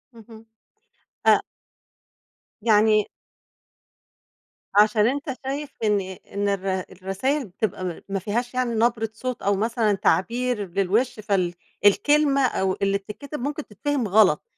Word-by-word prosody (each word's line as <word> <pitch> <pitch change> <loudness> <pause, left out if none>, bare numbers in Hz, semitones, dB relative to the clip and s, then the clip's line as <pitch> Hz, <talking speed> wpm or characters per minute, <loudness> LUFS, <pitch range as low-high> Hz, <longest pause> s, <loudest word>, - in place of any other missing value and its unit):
اهم. 225 0 -14 0.8
أ - - +6 1.2
يعني 215 -1 +4 1.7
عشان 210 +1 +5
أنت 275 0 -2
شايف 280 +2 -3
إن 210 -2 +2
إن 190 +2 -5
الر 190 -1 -1
الرسايل 195 +10 -2
بتبقى 195 0 -3
م 175 -2 -4
ما 195 0 -1
فيهاش 240 +6 -2
يعني 250 -2 0
نبرة 225 -1 +1
صوت 255 +2 -5
أو 200 0 +2
مثلًا 220 0 +1
تعبير 225 +3 0
للوِش 210 +6 0
فال 190 -4 0 0.3
الكلمة 285 +6 +4
أو 190 -5 0
اللي 200 0 +2
بتتكتب 255 +9 -8
ممكن 290 +3 -3
تتفهم 265 +2 -2
غلط، 195 -6 +4
215 Hz, 120 wpm, -24 LUFS, 195-250 Hz, 1.7 s, أ